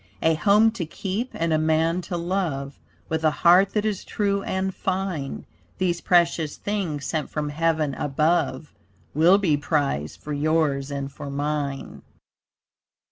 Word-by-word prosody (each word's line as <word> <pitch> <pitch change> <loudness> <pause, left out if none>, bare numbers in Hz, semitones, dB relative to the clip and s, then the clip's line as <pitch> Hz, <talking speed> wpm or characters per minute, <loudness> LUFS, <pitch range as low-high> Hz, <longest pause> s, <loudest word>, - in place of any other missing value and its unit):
A 160 - +4
home 205 +7 +4
to 215 -6 -4
keep 200 +9 -3
and 165 -1 0
a 155 - +3
man 160 +2 +1
to 175 - -2
love, 170 -6 -2 0.3
With 160 0 -2
a 155 - +5
heart 180 +5 +4
that 210 0 0
is 210 -4 -1
true 200 -1 -1
and 190 0 -2
fine. 185 -8 -3 0.3
These 175 -2 0
precious 170 -3 +2
things 180 -9 -3
sent 155 +1 -2
from 150 -1 -3
heaven 155 -1 0
above, 150 +3 0 0.4
Will 170 +5 +5
be 170 -8 +2
prized 145 - -1
for 150 - -6
yours 145 -2 +1
and 140 -1 -4
for 140 +1 -8
mine. 145 -1 -3
160 Hz, 145 wpm, -24 LUFS, 145-185 Hz, 0.4 s, a